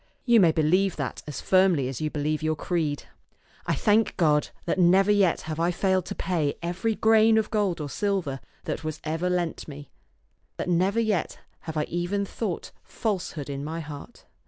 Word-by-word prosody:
You 240 -2 +6
may 175 -5 +6
believe 175 +5 +2
that 140 -3 -4
as 150 - -5
firmly 185 -8 +3
as 130 0 -5
you 155 - 0
believe 150 +1 -2
your 155 0 0
creed. 155 -3 -2 0.6
I - - +1
thank 215 +1 +2
God 150 -4 +3 0.2
that 175 - -1
never 190 +3 +5
yet 200 -4 +3
have 155 0 -5
I 170 +1 +2
failed 185 0 +1
to - - -5
pay 160 -6 -1
every 190 +6 -1
grain 220 0 +5
of 220 - 0
gold 205 -6 0
or 150 - -3
silver 180 -6 -2 0.2
that - - -4
was 155 -1 -4
ever 160 +3 -1
lent 175 -2 -2
me, 145 -2 -10 0.7
that - - -3
never 185 +5 +2
yet 215 -7 0 0.2
have 160 -1 -6
I 150 - +2
even 175 +5 -2
thought 195 -2 -4
false 210 -6 -3
hood 145 -4 -6
in 140 -1 -4
my 160 +3 -4
heart. 150 +8 -9
175 Hz, 185 wpm, -26 LUFS, 155-195 Hz, 0.7 s, You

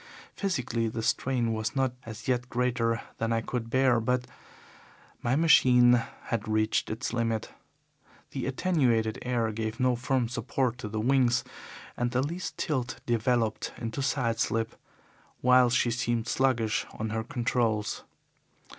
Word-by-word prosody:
Physically, 125 - -1
the 110 0 -4
strain 120 -1 +1
was 110 +4 -2
not 130 -2 +1
as 110 0 -8
yet 125 -1 0
greater 115 -2 0 0.2
than 115 0 0
I 115 0 +1
could 115 0 -4
bear 130 -1 +3
but 125 +2 0 1.0
my 120 +2 +1
machine 125 -6 +6 0.3
had 115 -2 -3
reached 110 0 +1
its 115 +3 -3
limit. 115 -2 -1 0.8
The - - -3
attenuated 130 -8 +1
air 120 -3 0
gave 110 +2 -4
no 125 -1 +3
firm 125 0 0
support 125 +1 -1
to 110 - -5
the 110 +1 -3
wings, 125 +1 +3 0.5
and 120 0 0
the 125 +2 0
least 170 +5 -5
tilt 130 -7 -2
developed 120 -1 0
into 115 +3 -4
side 120 -4 0
slip, 115 -1 0 0.7
while 125 0 +6
she 120 0 +2
seemed 120 -1 -1
sluggish 120 -5 +1
on 110 0 -4
her 110 0 -1
controls. 115 -2 -1
120 Hz, 140 wpm, -28 LUFS, 115-125 Hz, 1.0 s, machine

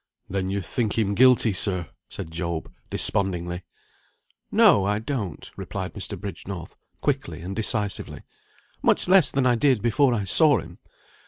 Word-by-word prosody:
"Then 95 -1 -2
you 100 0 -2
think 110 +4 -2
him 105 -3 +1
guilty, 125 -1 +5
sir?" 90 -5 -1 0.2
said 80 - -7
Job, 85 -1 -4 0.2
despondingly. 90 -3 +1 0.9
"No, 100 - +5
I 105 +1 0
don't," 110 - -4
replied 95 -2 -6
Mr. 100 -2 -6
Bridgenorth, 95 -2 -7 0.3
quickly - - -2
and 95 +3 -6
decisively. 105 -2 -2 0.6
"Much - - +2
less 185 -6 +6
than 135 -1 0
I 125 - +4
did 125 -2 +2
before 120 +2 +3
I 105 - -2
saw 145 - +4
him. 85 +1 -11
100 Hz, 145 wpm, -24 LUFS, 90-120 Hz, 0.9 s, less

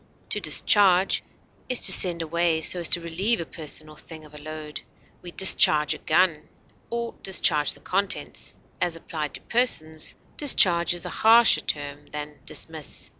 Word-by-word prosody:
To - - 0
discharge 195 -2 +3 0.5
is 250 - +3
to - - +5
send 170 -3 +3
away 165 0 0
so 180 - +3
as 170 - +1
to 175 - +2
relieve 190 +8 0
a 170 - -4
person 155 -1 -4
or 155 - -14
thing 155 0 -12
of 150 - -18
a 150 - -11
load; 155 0 -8 0.4
we 175 - -9
discharge 150 -5 +3
a - - -10
gun 160 -1 +1 0.4
or 235 0 -4
discharge 155 -5 +1
the - - -18
contents; 195 +1 -2 0.2
as 170 -2 0
applied 160 -4 -6
to - - -9
persons, 160 -11 0 0.2
discharge 175 - +2
is 175 - -4
a - - -4
harsher 230 +1 +6
term 145 0 -5
than 150 -1 -8
dismiss. 160 -2 -3
165 Hz, 165 wpm, -24 LUFS, 155-190 Hz, 0.5 s, harsher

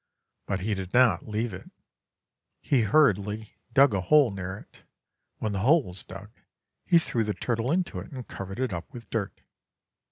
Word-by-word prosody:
But 95 -1 -2
he 105 +3 -1
did 95 +1 -5
not 120 -9 +4
leave 110 +1 -2
it. 90 - -9 0.9
He 135 -4 +2
hurriedly 105 -4 +2
dug 140 -4 +5
a 100 - 0
hole 140 - +5
near 95 0 -5
it; - - -16 0.6
when 110 - -2
the 100 - -2
hole 145 - +4
was 90 -3 -8
dug, 95 +3 -10 0.5
he 175 - +4
threw 120 -8 0
the 105 -1 -2
turtle 120 +2 -1
into 180 +1 -1
it - - -10
and 130 -4 -8
covered 95 +3 -7
it 130 -6 -1
up 85 - -6
with 120 -4 -11
dirt. 105 -4 -3
110 Hz, 180 wpm, -27 LUFS, 95-130 Hz, 0.9 s, dug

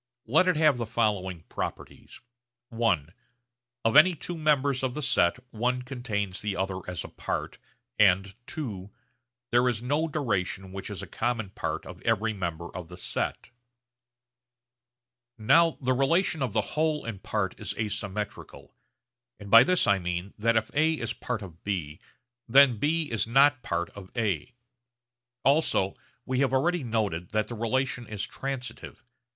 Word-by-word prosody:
Let 160 +11 +4
it 185 - +3
have 150 -4 +4
the 115 -2 -3
following 100 -7 -1
properties: - - -6 0.5
(i) 115 -10 +1 0.8
of 115 - +2
any 170 +4 +8
two 175 +3 -5
members 145 -4 +2
of 130 -2 -2
the 150 - -3
set 125 -10 +3
one 125 +3 -1
contains 110 -7 -3
the 105 -2 -2
other 95 0 -2
as 90 -3 -4
a - - -7
part, - - -4 0.4
and 95 -1 +4 0.2
(ii) 105 -10 -5 0.6
there 120 +1 +4
is 115 -1 -2
no 145 +6 +1
duration 100 - -2
which 95 0 -6
is - - -6
a - - -4
common 115 -5 -2
part - - -4
of - - -10
every 115 -1 +1
member 85 -3 -5
of 90 -2 -6
the 90 +1 -11
set. - - -2 1.9
Now 165 +9 +4
the 130 -1 +1
relation 160 +5 +2
of 125 -5 -2
whole 150 +8 0
and 110 -5 -6
part 95 -3 -1
is - - -4
asymmetrical; 105 -1 -5 0.7
and 100 -1 -10
by 115 +1 +10
this 180 +5 +2
I 100 - +3
mean 90 +2 -4
that 115 +1 +2
if 110 0 -1
A 155 +2 +3
is 115 -5 -3
part 120 -4 -4
of 85 -3 -12
B, 85 -7 -3 0.5
then 135 -1 +7
B 155 +1 0
is 115 -1 0
not 135 +2 +5
part 85 0 -2
of 95 -2 -11
A. 110 0 -1 0.9
Also 140 -9 +3 0.3
we 130 0 -1
have 135 -1 +2
already 165 +4 +2
noted 105 -8 -1
that 110 0 0
the - - -5
relation 120 +1 -1
is 105 -2 -3
transitive. 135 -2 -6
115 Hz, 155 wpm, -28 LUFS, 100-135 Hz, 1.9 s, by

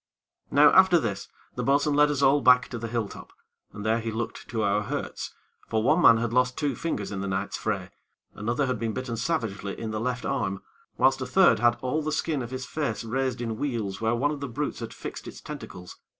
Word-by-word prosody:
Now 145 +1 +6
after 190 -2 +6
this, 110 - -2 0.3
the - - -3
bo'sun 145 +2 +2
led 150 +1 +5
us 140 -2 0
all 140 +2 +5
back 125 0 +5
to 120 - -5
the 115 - -4
hill 115 -2 -1
top, - - -11 0.4
and 105 0 -8
there 110 +1 +2
he 115 0 -3
looked 115 +1 -5
to 115 -3 -2
our 100 +1 +2
hurts; 140 +7 -5 0.3
for 110 -1 0
one 155 +8 +3
man 115 -7 +8
had 115 0 -2
lost 125 0 +2
two 145 -3 0
fingers 105 -12 -3
in 95 -2 -3
the 100 - -3
night's 95 0 -2
fray; - - -3 0.4
another 120 +7 -1
had 130 -3 -2
been 115 -1 -2
bitten 125 -1 -4
savagely 115 -6 -2
in 110 -1 -4
the 110 - -2
left 125 +1 -2
arm; 95 -8 -2 0.3
whilst 135 +1 +3
a 130 - -3
third 185 - +5
had 120 +1 +3
all 130 +5 0
the 155 0 -2
skin 150 -2 -1
of 120 - -5
his 130 0 -5
face 140 -9 -3
raised 125 +1 -2
in 115 -2 -3
wheals 110 -8 -3
where 115 +1 +1
one 140 +5 +1
of 150 - -4
the 140 -1 -5
brutes 145 +5 -3
had 115 -1 -6
fixed 115 - -8
its - - -9
tentacles. 90 0 -9
120 Hz, 230 wpm, -26 LUFS, 110-140 Hz, 0.4 s, man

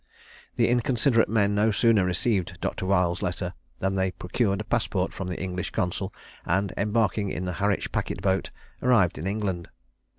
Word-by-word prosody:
The - - +3
inconsiderate 120 0 +3
men 105 -2 +2
no 105 +2 +3
sooner 110 -1 +4
received 90 +1 0
Dr. 95 - -3
Weil's 90 -3 +2
letter 90 0 -2 0.2
than 95 0 -1
they 95 -1 +1
procured 100 +2 -1
a - - -2
passport 105 -4 0
from 95 - -5
the 90 - -4
English 90 -1 -3
consul, 95 -1 -2 0.3
and, 95 +2 0
embarking 105 -1 +1
in 90 - -3
the 90 - -2
Harwich 100 -1 +1
packet - - -2
boat, 95 -1 0 0.3
arrived 115 -9 +3
in 85 - -3
England. 95 -4 -2
100 Hz, 165 wpm, -26 LUFS, 90-110 Hz, 0.3 s, sooner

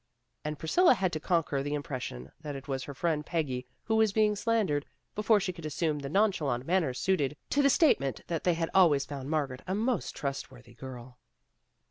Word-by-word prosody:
And 150 0 -3
Priscilla 305 - +4
had 185 -4 0
to 155 - -1
conquer 155 -4 0
the 145 +1 -2
im 145 - -3
pression 70 - -6
that 150 -2 -5
it 135 +1 -8
was 135 -2 -3
her 140 - -7
friend 155 0 0
Peggy 135 -7 -2 0.2
who 220 0 +1
was 220 -2 +4
being 210 0 +3
slandered, 205 -10 0 0.3
before 210 0 +3
she 185 -2 -2
could 170 -2 -11
assume 155 0 -1
the 140 -1 -5
nonchalant 155 - +1
manner 170 -4 +2
suited 145 0 0
to 285 - +3
the 280 - +5
statement 140 - +3
that 165 -2 -3
they 175 -2 +3
had 165 0 -2
always 155 -7 +5
found 135 -1 -6
Margaret 140 -5 -1
a 190 - 0
most 225 0 -1
trust 140 -1 -3
worthy 120 -2 -15
girl. 125 0 -10
155 Hz, 200 wpm, -30 LUFS, 135-190 Hz, 0.3 s, the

